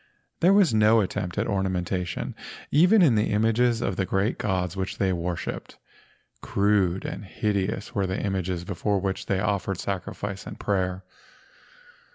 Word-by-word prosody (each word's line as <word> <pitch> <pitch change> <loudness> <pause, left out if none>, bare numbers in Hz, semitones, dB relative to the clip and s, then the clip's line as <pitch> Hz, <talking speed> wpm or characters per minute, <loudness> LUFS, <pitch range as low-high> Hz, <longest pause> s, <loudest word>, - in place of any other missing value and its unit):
There 180 - +5
was 195 - +5
no 110 +1 +5
attempt 90 -1 -3
at 105 - +1
ornamentation 95 -3 -2 0.4
even 185 +7 +6
in 140 -8 +5
the 105 0 +2
images 115 +2 +2
of 95 - -2
the 95 - +1
great 95 +5 0
gods 90 -3 -1
which 95 -1 -3
they 95 -2 +1
worshipped. 85 0 -4 0.6
Crude 100 -3 +1
and - - -5
hide¬ 100 -1 -1
ous 100 - -7
were 100 -5 0
the 95 +1 -2
images 95 -3 -2
before 100 +2 -1
which 95 0 -3
they 95 - +1
offered 100 -2 -1
sacrifice 100 +1 -4
and - - -8
prayer. 95 -2 -1
100 Hz, 155 wpm, -26 LUFS, 95-105 Hz, 0.6 s, even